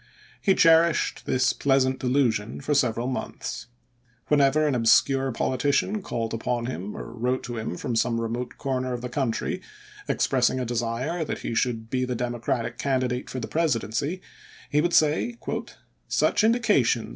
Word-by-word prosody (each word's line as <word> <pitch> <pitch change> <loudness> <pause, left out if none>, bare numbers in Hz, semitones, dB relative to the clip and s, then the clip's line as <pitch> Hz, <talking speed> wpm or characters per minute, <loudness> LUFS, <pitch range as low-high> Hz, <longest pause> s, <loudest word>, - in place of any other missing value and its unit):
He 195 -2 +3
cherished 165 0 +3
this 130 0 +2
pleasant 135 -1 +2
delusion 125 -5 0
for 145 +2 -1
several 120 -4 +1
months. 125 -2 -4 0.6
Whenever 145 +1 +4
an 150 - +1
obscure 135 +3 +3
politician 140 - 0
called 115 -10 -3
upon 115 +1 -2
him 105 -5 -5
or 115 - -7
wrote 125 +2 -1
to 120 -1 -5
him 110 -5 -4
from 120 - -3
some 115 +1 +1
remote 115 +2 -4
corner 130 -2 -2
of 120 - -4
the 125 - -5
country, 125 -3 -2 0.5
expressing 130 -1 +1
a 125 - -2
desire 120 +8 -2
that - - -5
he - - -2
should 115 -1 -1
be 130 -1 0
the 125 -1 -2
Democratic 120 0 -2
candidate 130 -2 -1
for 130 - -4
the 120 - -4
Presidency, 150 - -1 0.5
he 150 - +3
would 170 +1 0
say, 155 +10 +2 0.7
"Such - - +2
indications 215 - +2
125 Hz, 155 wpm, -25 LUFS, 115-145 Hz, 0.7 s, Whenever